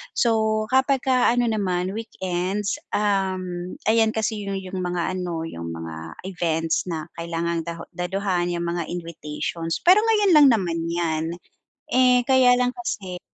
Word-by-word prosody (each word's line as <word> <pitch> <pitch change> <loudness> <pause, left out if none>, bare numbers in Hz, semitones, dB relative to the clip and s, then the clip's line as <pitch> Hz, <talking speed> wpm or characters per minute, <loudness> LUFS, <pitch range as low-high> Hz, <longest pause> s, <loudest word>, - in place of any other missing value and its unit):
So 220 -2 +2
kapagka 260 -2 +3
ano 245 0 +2
naman, 190 -3 -1
weekends, 190 -2 -2 0.2
um, 185 -3 -1
ayan 220 0 +4
kasi 215 -1 -1
yu 200 0 -3
'yung 190 0 -6
mga 180 +1 -1
ano, 170 -3 -3
'yung 85 - -6
mga 80 0 -8
events 165 -3 0
na 160 -2 -4
kailangang 170 0 -2
da 170 0 -5 0.2
daluhan 180 -1 -1
'yung 170 0 -2
mga 170 -2 -2
invitations, 165 -1 -4
pero 370 +4 +7
ngayon 420 -4 +3
lang 295 -2 +8
naman 175 -6 -1
'yan. 165 -2 -1 0.7
Eh, 250 -1 +5
kaya 255 -2 +6
lang 250 0 +2
kasi, 190 -7 -4
185 Hz, 140 wpm, -23 LUFS, 170-225 Hz, 0.7 s, lang